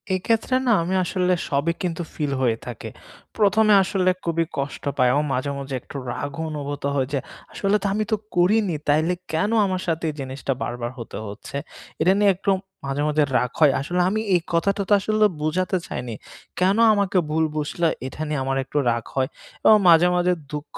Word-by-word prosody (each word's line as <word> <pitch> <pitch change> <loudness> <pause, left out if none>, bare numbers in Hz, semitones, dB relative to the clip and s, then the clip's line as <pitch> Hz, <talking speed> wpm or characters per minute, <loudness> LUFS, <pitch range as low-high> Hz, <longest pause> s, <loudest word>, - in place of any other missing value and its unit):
এক্ষেত্রে 225 +6 0
না - - +5
আমি 185 +3 -1
আসলে 180 +1 +1 0.2
সবই 145 +4 +1
কিন্তু 175 -2 -2
ফিল 145 -3 -2
হয়ে 115 -3 +2
থাকে। 120 -3 -7 0.5
১ম 215 +1 +4
এ - - +8
আসলে 185 0 +1
খুবই 165 0 0
কষ্ট 140 +1 -4
পাই 125 -2 +4
ও - - +3
মাঝে, 130 +3 -1
মাঝে 140 0 -6
একটু - - -14 0.2
রাগ 145 +4 -4 0.2
অনুভূত 145 -1 -5
হয় 135 -2 +1
যে, 140 - +1 0.3
আসলে 195 +1 +1
তো - - -3
আমি 215 - 0
তো - - +4 0.2
করিনি, 185 +1 +3
তাইলে 155 +4 +3 0.2
কেনো 205 +8 +1
আমার 185 -1 -2
সাথে 165 0 -1
এই - - -4
জিনিসটা 135 0 -3
বার, 120 - -2
বার 120 - -3
হতে 115 - -7
হচ্ছে? 105 +6 -9 0.5
এটা 175 +4 +5
নিয়ে 205 -1 +5
একটু 195 +2 -3 0.4
মাঝে, 135 +1 -2
মাঝে 150 0 +2
রাগ 125 - 0
হয়। 150 -3 +6
আসলে 175 +5 -1
আমি 215 +3 -1
এই 175 - +4
কথাটা 200 +4 +1
তো 210 - +5
আসলে 215 +2 +2 0.2
বুঝাতে 180 +4 0
চাইনি, 120 -1 -5 0.5
কেনো 195 +5 +3
আমাকে 200 -2 +1
ভুল 160 +1 +1
বুঝলে? 155 +3 0 0.2
এটা 130 - -8
নিয়ে 150 -2 -1
আমার 135 0 -1
একটু 135 - -5
রাগ 115 -1 -1
হয় 130 -1 +1 0.4
এবং 215 - +8
মাঝে, 170 +1 +7
মাঝে 180 0 +2 0.2
দুঃখ 150 0 -7
165 Hz, 195 wpm, -23 LUFS, 140-190 Hz, 0.5 s, এ